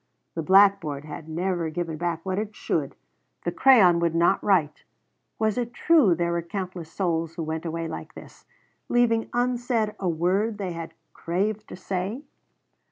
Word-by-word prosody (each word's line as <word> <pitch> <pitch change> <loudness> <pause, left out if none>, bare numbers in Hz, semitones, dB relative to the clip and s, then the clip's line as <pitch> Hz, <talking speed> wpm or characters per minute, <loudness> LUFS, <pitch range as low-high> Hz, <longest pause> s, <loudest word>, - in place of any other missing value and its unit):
The 165 - -3
blackboard 190 -5 +4
had 155 +1 -8
never 175 0 -1
given 165 0 -4
back 170 0 -3
what 190 +1 -1
it 210 0 -5
should; - - -2 0.5
the - - -1
crayon 195 -11 +6
would 170 -1 0
not 170 +3 +3
write. 170 -7 +1 0.5
Was 220 +1 0
it 240 0 -4
true 295 - +4
there 170 +1 -1
were 170 0 0
countless 180 -2 -6
souls 165 -3 -1
who 170 - -3
went 160 +1 -4
away 165 0 -3
like - - -8
this - - -13 0.4
leaving 230 -2 +2
unsaid 245 -3 0
a 185 - 0
word 190 +7 0
they 195 -3 -3
had 165 -1 -7 0.2
craved 205 +5 -2
to - - -8
say? 190 +7 -4
180 Hz, 165 wpm, -25 LUFS, 165-210 Hz, 0.5 s, crayon